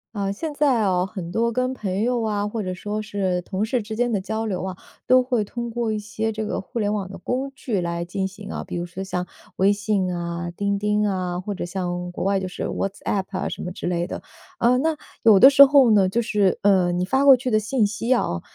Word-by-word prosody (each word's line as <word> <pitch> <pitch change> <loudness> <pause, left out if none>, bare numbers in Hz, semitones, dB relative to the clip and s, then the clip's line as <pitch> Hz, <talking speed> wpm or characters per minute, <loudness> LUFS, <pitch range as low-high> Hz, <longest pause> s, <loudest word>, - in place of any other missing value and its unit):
呃， 195 -1 -1
现 300 +9 -5
在 275 -6 +2
哦， 185 -1 +1
很 180 -5 -6
多 230 +3 0
跟 255 +1 0
朋 200 -5 -3
友 240 +1 +1
啊， 210 -2 -1
或 215 +1 -3
者 185 -1 -3
说 210 +4 -4
是 195 -4 -1
同 190 +2 -3
事 230 +2 0
之 220 +1 -6
间 245 +1 0
的 210 - +1
交 220 +4 -3
流 195 -5 -2
啊， 190 -1 -4 0.3
都 255 0 +6
会 250 -3 0
通 235 +3 -5
过 235 -1 -2
一 215 - -1
些 220 +2 -3
这 215 0 -3
个 - - -2
互 235 +5 -6
联 210 -1 0
网 195 -3 -3
的 195 - -8
工 255 +8 -3
具 225 -7 -2
来 170 -1 -2
进 190 +2 -2
行 195 +1 -10
啊， - - -5
比 - - -5
如 175 0 -2
说 175 +2 -8
像 180 -1 -3 0.3
微 195 +2 +4
信 205 -3 0
啊、 170 0 -4
钉 200 +3 -1
钉 210 +1 +1
啊， 180 -2 -2
或 200 +2 -4
者 - - -4
像 180 -1 -4
国 175 - -4
外 195 0 +1
就 185 - -3
是 - - -5
WhatsApp 195 0 -2
啊 195 - -3
什 - - -5
么 180 - -4
之 175 - -5
类 175 -1 0
的。 - - -6 0.4
呃， 245 +2 +4
那 315 +2 0 0.3
有 215 -4 +7
的 265 - +10
时 280 0 +9
候 275 -3 +6
呢， 200 -3 +4
就 235 +5 +1
是， 210 -5 +1
呃， 190 -3 +3
你 180 +1 0
发 265 +8 +1
过 275 -2 +8
去 255 +1 -3
的 215 - +3
信 220 0 +1
息 220 +4 0
啊， 85 - -1
205 Hz, 290 characters per minute, -23 LUFS, 185-230 Hz, 0.4 s, 的